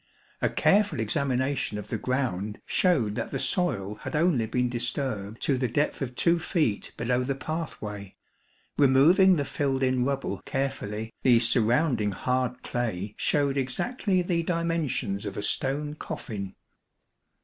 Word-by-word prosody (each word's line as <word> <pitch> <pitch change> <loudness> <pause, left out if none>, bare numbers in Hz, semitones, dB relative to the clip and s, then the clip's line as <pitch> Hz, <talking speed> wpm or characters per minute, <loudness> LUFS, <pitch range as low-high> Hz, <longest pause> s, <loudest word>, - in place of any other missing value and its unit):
A - - +2
careful 200 - +2
examination 130 0 0
of 105 0 -7
the - - -1
ground 110 -6 -2
showed 135 - +2
that - - -3
the - - -3
soil 105 - 0
had - - -5
only 150 -8 +2
been 125 +2 0
disturbed 120 -3 -3
to 135 -3 +2
the 125 - +1
depth 145 +4 -1
of 125 -2 -4
2 170 +4 +3
feet 155 - 0
below 125 +1 0
the 135 +1 -1
pathway. 110 - -5 0.6
Removing 155 +8 +6
the 145 -3 -1
filled 135 -1 -1
in 130 -1 +2
rubble 135 -8 -2
carefully, 110 -5 -3
the 125 -2 +5
surrounding 115 -1 +2
hard 125 +3 -1
clay 110 -5 -3
showed 140 -2 +1
exactly 185 - 0
the 175 -1 0
dimensions 165 - -1
of 100 -2 -5
a 105 - -2
stone 145 +5 0
coffin. 100 -9 -6
130 Hz, 140 wpm, -27 LUFS, 110-150 Hz, 0.6 s, Removing